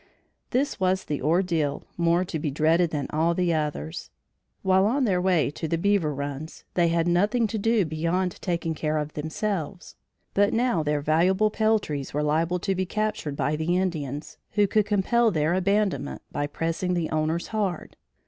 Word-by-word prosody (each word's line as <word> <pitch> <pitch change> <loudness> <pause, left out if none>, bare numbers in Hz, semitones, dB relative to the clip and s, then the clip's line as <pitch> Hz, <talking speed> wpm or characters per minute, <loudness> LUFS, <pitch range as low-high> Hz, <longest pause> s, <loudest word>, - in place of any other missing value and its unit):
This 275 +3 0
was 185 0 +1
the 145 - -3
ordeal 160 -2 +1
more 170 +1 +2
to 160 - -4
be 150 - -1
dreaded 160 +4 +2
than 150 -3 -2
all 165 +2 +1
the 175 -1 +1
others. 150 - -3 0.5
While 190 +1 +4
on 265 +5 +1
their 185 -6 +2
way 180 -6 +2
to 160 - -5
the 165 - 0
beaver 195 -3 +2
runs, 145 +2 -6
they 175 -1 +3
had 165 0 +1
nothing 205 +7 +2
to 220 0 -2
do 225 -1 +2
beyond 165 +3 -1
taking 170 -2 -1
care 155 0 -1
of 150 0 -3
themselves; 175 +3 -4 0.4
but 205 0 +3
now 240 -7 +2
their 150 -1 0
valuable 185 +8 +3
peltries 210 -13 0
were 150 - +1
liable 160 +4 +1
to 195 0 0
be 185 0 -2
captured 215 -8 -2
by 145 +1 0
the 165 +3 0
Indians, 150 -6 -3
who 205 0 +4
could 210 +1 +1
compel 225 +3 +3
their 160 -3 +1
abandonment 190 -6 0
by 145 - -2
pressing 165 +4 -2
the 170 -2 -1
owners 155 +2 -1
hard. 200 -6 -2
170 Hz, 175 wpm, -26 LUFS, 155-195 Hz, 0.5 s, While